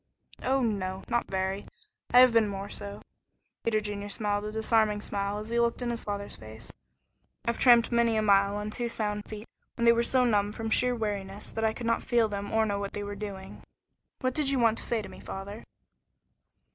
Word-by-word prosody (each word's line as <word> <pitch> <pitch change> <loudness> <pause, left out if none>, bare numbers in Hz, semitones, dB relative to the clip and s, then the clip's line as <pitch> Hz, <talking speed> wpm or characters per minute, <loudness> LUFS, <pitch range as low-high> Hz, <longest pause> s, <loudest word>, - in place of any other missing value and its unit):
"Oh, 265 0 +1
no. 190 -4 -2
Not 240 0 0
very. 190 +1 -2 0.4
I 250 - +8
have 255 -2 +6
been 225 -2 +4
more 200 0 -5
so." 200 0 -7 0.6
Peter 220 -2 +2
Junior 205 -1 -5
smiled 205 0 -1
a 210 - -4
disarming 220 -1 +2
smile 200 0 -2
as 215 +1 -6
he 235 0 +1
looked 235 +1 +1
in 240 - -1
his 235 - -4
father's 200 -1 -4
face. 110 +1 -11 0.7
"I've 235 0 -1
tramped 240 -2 +6
many 235 -1 +3
a 215 - +2
mile 200 -1 +4
on 210 +1 -4
two 240 +2 -2
sound 210 -2 -2
feet 215 +1 -8 0.3
when 235 - 0
they 235 - +8
were 235 - +2
so 250 +1 +3
numb 205 -3 +2
from 225 0 -4
sheer 250 +2 +4
weariness 205 -3 -4
that 225 - -3
I 220 0 +2
could 235 - -7
not 230 0 +1
feel 235 -2 +2
them 205 -1 -5
or 220 0 +3
know 200 -1 -1
what 200 0 -4
they 205 - -4
were 205 0 -5
doing. 195 -2 -7 0.6
What 255 -1 0
did 295 -1 +1
you 275 - +1
want 230 -2 +3
to - - 0
say 230 -3 -1
to - - -7
me, - - -12
father?" 200 +3 -7
215 Hz, 215 wpm, -29 LUFS, 200-235 Hz, 0.7 s, I